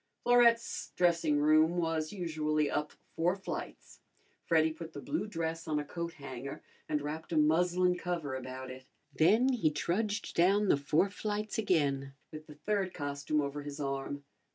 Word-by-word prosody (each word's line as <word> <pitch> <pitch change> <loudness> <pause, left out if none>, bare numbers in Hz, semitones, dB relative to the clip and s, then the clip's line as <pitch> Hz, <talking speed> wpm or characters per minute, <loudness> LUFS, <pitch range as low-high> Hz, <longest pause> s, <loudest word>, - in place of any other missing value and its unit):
Florette's 235 -1 +3
dressing 170 -4 +3
room 155 +3 +4
was 160 -2 -1
usually 155 -5 -1
up 150 0 -1 0.2
four 175 +3 +2
flights. 195 - -7 0.5
Freddy 160 -1 +3
put 160 0 -9
the - - -6
blue 295 -8 -2
dress 165 -4 -3
on 155 -1 0
a 145 - -2
coat 170 +2 -5
hanger 135 -2 -7 0.3
and 150 -1 0
wrapped 155 +3 -5
a 165 - +1
muslin 180 +4 +3
cover 175 -6 -3
about 130 0 -6
it. 130 0 -11 0.3
Then 215 - +4
he 220 -11 +2
trudged 205 +7 -1
down 195 +4 +3
the - - +5
four 155 +7 +1
flights 210 +1 -3
again, 140 -9 +1 0.2
with 155 -1 -9
the 150 - -11
third 190 +4 -1
costume 145 +1 -1
over 145 +1 -3
his 145 0 -7
arm. 140 0 -3
160 Hz, 160 wpm, -32 LUFS, 145-180 Hz, 0.5 s, the